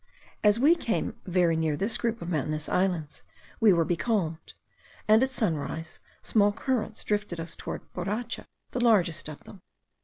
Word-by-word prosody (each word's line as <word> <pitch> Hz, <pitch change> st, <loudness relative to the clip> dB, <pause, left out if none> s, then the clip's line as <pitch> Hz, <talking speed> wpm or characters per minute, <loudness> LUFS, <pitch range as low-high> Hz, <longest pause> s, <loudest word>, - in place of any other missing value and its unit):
As 210 Hz, +1 st, +5 dB
we 295 Hz, +6 st, +6 dB
came 230 Hz, -8 st, -2 dB
very 175 Hz, -2 st, +3 dB
near 160 Hz, -2 st, 0 dB
this 210 Hz, +5 st, +1 dB
group 230 Hz, -3 st, -1 dB
of 170 Hz, -, -5 dB
mountainous 155 Hz, -1 st, -1 dB
islands, 180 Hz, -5 st, -1 dB, 0.4 s
we 220 Hz, -2 st, +6 dB
were 170 Hz, -2 st, +3 dB
becalmed; 175 Hz, -3 st, -1 dB, 0.5 s
and 215 Hz, +2 st, +6 dB
at 265 Hz, -, +3 dB
sunrise, 165 Hz, -, -2 dB, 0.2 s
small 205 Hz, -2 st, +4 dB
currents 230 Hz, -1 st, -2 dB
drifted 205 Hz, -5 st, -2 dB
us 165 Hz, 0 st, -5 dB
toward -, -, -6 dB
Boracha, 210 Hz, +7 st, -3 dB, 0.2 s
the 245 Hz, -, -1 dB
largest 175 Hz, -9 st, +3 dB
of 150 Hz, -, -10 dB
them. 195 Hz, -, -13 dB
190 Hz, 155 wpm, -28 LUFS, 165-220 Hz, 0.5 s, we